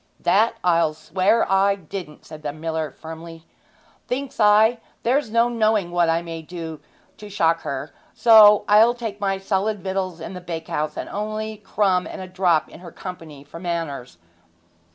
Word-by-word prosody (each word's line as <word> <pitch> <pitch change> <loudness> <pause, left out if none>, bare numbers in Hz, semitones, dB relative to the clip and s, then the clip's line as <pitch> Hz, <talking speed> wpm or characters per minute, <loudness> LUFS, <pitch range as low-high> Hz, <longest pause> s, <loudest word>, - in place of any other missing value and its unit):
'That 205 +6 +2
I'll 165 -3 +2
swear 185 +8 +1
I 195 +1 +3
didn't!' 175 -3 -9
said 155 -1 -11
the 150 -1 -3
miller 160 0 -3
firmly. 165 0 -10 0.6
'Thinks 270 +1 -4
I, 215 +2 +5 0.2
there's 255 +1 +1
no 230 +2 +3
knowing 215 -6 +1
what 175 -1 +2
I 165 +1 +1
may 165 -1 -6
do 160 -1 -7 0.4
to 210 - -10
shock 165 -4 +1
her, 140 +2 -5 0.2
so 215 -3 +7
I'll 220 +4 +5
take 220 -4 -6
my 195 -1 0
solid 195 +1 -1
victuals 190 -2 -3
in 165 - -7
the 180 - -8
bakehouse, 160 -3 -4
and - - -4
only 215 +1 -4
a 215 - -10
crumb 195 -3 0
and - - -8
a 185 - -6
drop 185 -3 +1
in - - -14
her 175 -2 -11
company 160 -7 -9
for 145 +3 -11
manners.' 165 - -4
185 Hz, 170 wpm, -22 LUFS, 165-210 Hz, 0.6 s, so